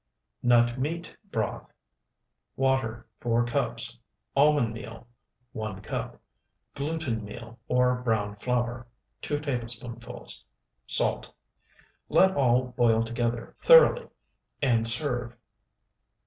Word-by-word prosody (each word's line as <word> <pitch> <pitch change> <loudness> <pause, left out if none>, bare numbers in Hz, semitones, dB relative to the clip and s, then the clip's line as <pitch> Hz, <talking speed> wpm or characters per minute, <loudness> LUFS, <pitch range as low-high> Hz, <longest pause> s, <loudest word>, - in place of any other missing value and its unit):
NUT 120 0 +3
MEAT 165 +6 -3
BROTH 110 - -3 0.8
Water, 130 -4 0
4 120 0 +1
cups. 120 - -2 0.4
Almond 140 -5 +4
meal, 115 0 -9 0.5
1 110 -3 -5
cup. - - -5 0.5
Gluten 140 -6 -3
meal 115 +3 -10
or 125 0 +2
browned 105 -4 -1
flour, 120 -1 -1 0.3
2 145 - -2
tablespoonfuls. 120 -3 -5 0.4
Salt. - - +3 0.8
Let 190 0 +5
all 125 -2 +2
boil 115 -2 +3
together 115 0 -3
thoroughly, - - +6 0.5
and 115 -5 +2
serve. 120 -1 +1
120 Hz, 90 wpm, -27 LUFS, 115-135 Hz, 0.8 s, thoroughly